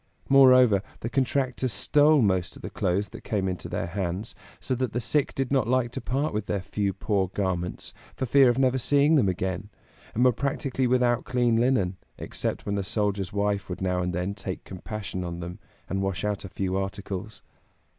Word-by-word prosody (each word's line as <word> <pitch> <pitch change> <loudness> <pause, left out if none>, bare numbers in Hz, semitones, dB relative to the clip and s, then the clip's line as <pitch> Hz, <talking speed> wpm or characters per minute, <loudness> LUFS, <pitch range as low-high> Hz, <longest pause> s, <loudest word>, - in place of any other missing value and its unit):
Moreover, 130 -6 +7 0.2
the 115 - -4
contractors 130 -1 0
stole 145 +7 +4
most 95 -4 +1
of - - -13
the - - -5
clothes 100 +3 0
that - - -10
came 100 -3 -1
into 90 -1 -4
their - - -2
hands, 95 +3 -3 0.3
so 130 - -2
that 125 -3 -2
the 120 - 0
sick 130 +5 0
did 135 -1 -2
not 130 -5 +2
like 125 -1 +1
to - - -5
part 140 +3 -1
with 105 -1 -2
their 100 -2 -1
few 100 +1 -1
poor 100 0 0
garments, 90 -2 -3 0.2
for 130 - -2
fear 135 +1 +6
of 120 - +1
never 130 -1 +2
seeing 145 +5 +3
them 125 -11 +4
again, 95 +2 -3 0.5
and 120 +3 +3
were 125 - +6
practically 135 0 -1
without 125 -1 +2
clean 120 -2 +1
linen, 115 -7 +2 0.2
except - - -4
when 100 0 -1
a - - -1
soldier's 100 -2 -1
wife 100 -1 -1
would 90 - -4
now 90 -1 0
and 90 0 -1
then 90 +3 -2
take 100 -2 -6
compassion 95 0 -6
on 85 -1 -5
them, 85 +1 -7 0.3
and 95 0 -2
wash 95 0 -2
out 105 -1 -2
a 95 - -7
few 95 +1 -2
articles. 95 +1 -4
105 Hz, 195 wpm, -26 LUFS, 95-125 Hz, 0.5 s, Moreover